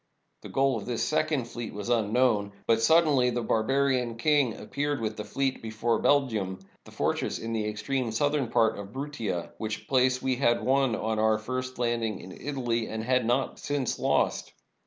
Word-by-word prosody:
The -, -, -9 dB
goal 135 Hz, -2 st, +2 dB
of 105 Hz, -, -7 dB
this 120 Hz, -2 st, -1 dB
second 155 Hz, -4 st, +1 dB
fleet 120 Hz, -2 st, -6 dB
was 105 Hz, +2 st, -5 dB
unknown. 110 Hz, -2 st, +2 dB
But 115 Hz, 0 st, +3 dB
suddenly 145 Hz, -2 st, +4 dB
the 120 Hz, -1 st, -2 dB
barbarian 125 Hz, +1 st, +1 dB
king 145 Hz, +2 st, +3 dB
himself 105 Hz, -2 st, -8 dB
appeared 145 Hz, 0 st, -1 dB
with 110 Hz, -1 st, -2 dB
the 105 Hz, -, -5 dB
fleet 135 Hz, +5 st, -2 dB
before 110 Hz, +1 st, -1 dB
Belgium, 110 Hz, -10 st, +1 dB, 0.3 s
the -, -, -13 dB
fortress -, -, -1 dB
in 115 Hz, 0 st, -5 dB
the 110 Hz, -1 st, -1 dB
extreme 120 Hz, +3 st, -2 dB
southern 145 Hz, +3 st, +1 dB
part 115 Hz, -2 st, +2 dB
of 100 Hz, -, -6 dB
Bruttia, 130 Hz, -11 st, -4 dB
which 110 Hz, -1 st, -4 dB
place 130 Hz, -2 st, +3 dB
we 130 Hz, -1 st, -1 dB
had 120 Hz, -3 st, +2 dB
won 135 Hz, -2 st, +2 dB
on 110 Hz, 0 st, -1 dB
our 110 Hz, 0 st, +3 dB
first 130 Hz, +3 st, -4 dB
landing 115 Hz, -3 st, -1 dB
in 95 Hz, -, -10 dB
Italy, 120 Hz, -3 st, -2 dB
and 110 Hz, 0 st, -4 dB
had 125 Hz, -1 st, +1 dB
not 125 Hz, +2 st, 0 dB
since 145 Hz, -3 st, -2 dB
lost. -, -, 0 dB
120 Hz, 180 wpm, -28 LUFS, 110-135 Hz, 0.3 s, suddenly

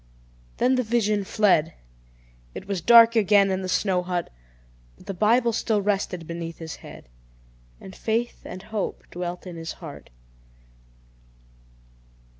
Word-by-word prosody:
Then 255 Hz, +1 st, +2 dB
the -, -, +2 dB
vision 215 Hz, -3 st, +1 dB
fled. 185 Hz, -6 st, +2 dB, 0.8 s
It -, -, -8 dB
was 195 Hz, -3 st, -2 dB
dark 230 Hz, +3 st, +7 dB
again 205 Hz, -2 st, +4 dB
in 190 Hz, 0 st, -1 dB
the 185 Hz, -, -4 dB
snow 185 Hz, -1 st, +1 dB
hut: 175 Hz, -1 st, -3 dB, 0.7 s
but -, -, -18 dB
the 200 Hz, -, -4 dB
Bible 230 Hz, +5 st, +2 dB
still 220 Hz, -1 st, 0 dB
rested 195 Hz, -4 st, -2 dB
beneath 170 Hz, 0 st, -6 dB
his 160 Hz, -2 st, -7 dB
head, -, -, -13 dB, 0.7 s
and 190 Hz, -, -11 dB
faith 230 Hz, +2 st, -2 dB
and 185 Hz, +1 st, -9 dB
hope 215 Hz, -3 st, -4 dB
dwelt 175 Hz, +1 st, -5 dB
in 175 Hz, -2 st, -8 dB
his 165 Hz, 0 st, -6 dB
heart. -, -, -11 dB
195 Hz, 135 wpm, -24 LUFS, 180-220 Hz, 0.8 s, dark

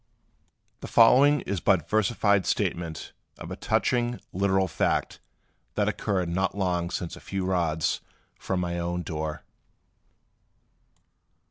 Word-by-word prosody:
The -, -, -7 dB
following 135 Hz, +5 st, +6 dB
is 100 Hz, -1 st, -3 dB
but 85 Hz, -3 st, +2 dB
versified 105 Hz, -2 st, +2 dB
statement 85 Hz, -2 st, -2 dB, 0.3 s
of -, -, -8 dB
a -, -, -3 dB
touching, 120 Hz, -1 st, 0 dB
literal 95 Hz, 0 st, +2 dB
fact 80 Hz, -, -1 dB, 0.6 s
that 105 Hz, -1 st, +1 dB
occurred 100 Hz, -3 st, -1 dB
not 95 Hz, +3 st, -1 dB
long 90 Hz, -3 st, 0 dB
since 85 Hz, -1 st, -4 dB
a -, -, -11 dB
few 95 Hz, -1 st, -3 dB
rods 85 Hz, -4 st, 0 dB, 0.4 s
from 95 Hz, -1 st, -2 dB
my 85 Hz, -1 st, -2 dB
own 85 Hz, +1 st, -2 dB
door. 80 Hz, -2 st, -4 dB
95 Hz, 120 wpm, -26 LUFS, 85-100 Hz, 0.6 s, following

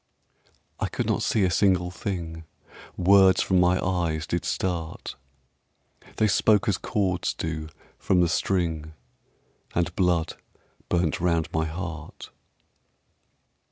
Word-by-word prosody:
I -, -, 0 dB
could -, -, -2 dB
not -, -, 0 dB
see 105 Hz, -, +1 dB
a 90 Hz, -, +2 dB
single 90 Hz, -1 st, +2 dB
thing, 85 Hz, -4 st, -5 dB, 0.5 s
Words 95 Hz, +1 st, +5 dB
from 95 Hz, -1 st, +2 dB
my 90 Hz, +1 st, +3 dB
eyes 85 Hz, -4 st, -1 dB
did 85 Hz, 0 st, -2 dB
start; 85 Hz, -3 st, -3 dB, 1.0 s
They 110 Hz, -, +3 dB
spoke 105 Hz, +2 st, +3 dB
as 100 Hz, -4 st, +1 dB
chords 95 Hz, -4 st, -1 dB
do 80 Hz, -1 st, -4 dB, 0.3 s
from 90 Hz, -, +2 dB
the 90 Hz, -, +4 dB
string 80 Hz, -3 st, -1 dB, 0.8 s
And 85 Hz, 0 st, 0 dB
blood 90 Hz, -3 st, +1 dB, 0.5 s
burnt 85 Hz, -3 st, +1 dB
round 85 Hz, -2 st, +1 dB
my 80 Hz, 0 st, +1 dB
heart. 80 Hz, -1 st, -7 dB
90 Hz, 120 wpm, -25 LUFS, 80-95 Hz, 1.0 s, Words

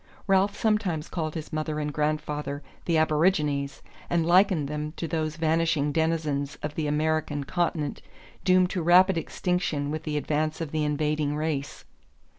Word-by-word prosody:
Ralph 195 Hz, +1 st, +2 dB
sometimes 205 Hz, -8 st, 0 dB
called 155 Hz, -3 st, -3 dB
his 160 Hz, 0 st, -6 dB
mother 155 Hz, 0 st, -2 dB
and 150 Hz, -1 st, -2 dB
grandfather 150 Hz, -1 st, -2 dB, 0.2 s
the 165 Hz, -2 st, +2 dB
Aborigines, 150 Hz, -3 st, +1 dB, 0.3 s
and 170 Hz, -2 st, +1 dB
likened 180 Hz, -3 st, +4 dB
them 150 Hz, +1 st, -4 dB
to 165 Hz, -, -3 dB
those 155 Hz, -1 st, -2 dB
vanishing 160 Hz, -2 st, +1 dB
denizens 155 Hz, -3 st, 0 dB
of 150 Hz, 0 st, -3 dB
the 155 Hz, -1 st, -2 dB
American 150 Hz, -1 st, 0 dB
continent 160 Hz, -1 st, -1 dB, 0.4 s
doomed 185 Hz, -1 st, +4 dB
to 180 Hz, -, -1 dB
rapid 180 Hz, +3 st, +6 dB
extinction 165 Hz, -4 st, -1 dB
with 155 Hz, 0 st, -3 dB
the 155 Hz, -1 st, -2 dB
advance 155 Hz, +1 st, -1 dB
of 160 Hz, -4 st, -4 dB
the 155 Hz, -1 st, 0 dB
invading 150 Hz, 0 st, 0 dB
race. 150 Hz, -2 st, -3 dB
155 Hz, 150 wpm, -27 LUFS, 150-165 Hz, 0.4 s, rapid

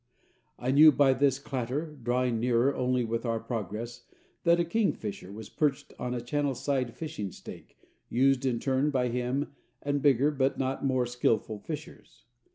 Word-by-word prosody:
I 125 Hz, +1 st, -1 dB
knew 155 Hz, +3 st, +8 dB
by 135 Hz, -1 st, +4 dB
his 135 Hz, 0 st, +2 dB
clatter, 135 Hz, +3 st, -4 dB
drawing 120 Hz, 0 st, 0 dB
nearer 120 Hz, +3 st, +2 dB
only 125 Hz, -1 st, 0 dB
with 115 Hz, 0 st, -2 dB
our 115 Hz, -2 st, -1 dB
progress, 115 Hz, 0 st, -5 dB, 0.4 s
that 170 Hz, 0 st, +5 dB
a 170 Hz, -, +2 dB
kingfisher 160 Hz, -, -2 dB
was 105 Hz, +1 st, -8 dB
perched 145 Hz, -1 st, -1 dB
on 125 Hz, 0 st, -2 dB
a 120 Hz, -, -3 dB
channel 140 Hz, +2 st, -1 dB
side 130 Hz, -2 st, -1 dB
fishing 150 Hz, -, -5 dB
stake, -, -, -12 dB, 0.3 s
used 135 Hz, +1 st, +3 dB
in 125 Hz, -3 st, 0 dB
turn 135 Hz, +3 st, +1 dB
by 125 Hz, -3 st, +1 dB
him 125 Hz, +4 st, -2 dB, 0.3 s
and 145 Hz, 0 st, -1 dB
bigger 140 Hz, +1 st, +4 dB
but 135 Hz, -2 st, 0 dB
not 135 Hz, 0 st, -2 dB
more 130 Hz, -2 st, +2 dB
skillful 115 Hz, -3 st, 0 dB
fishers. 150 Hz, +8 st, -9 dB
130 Hz, 165 wpm, -29 LUFS, 120-145 Hz, 0.4 s, knew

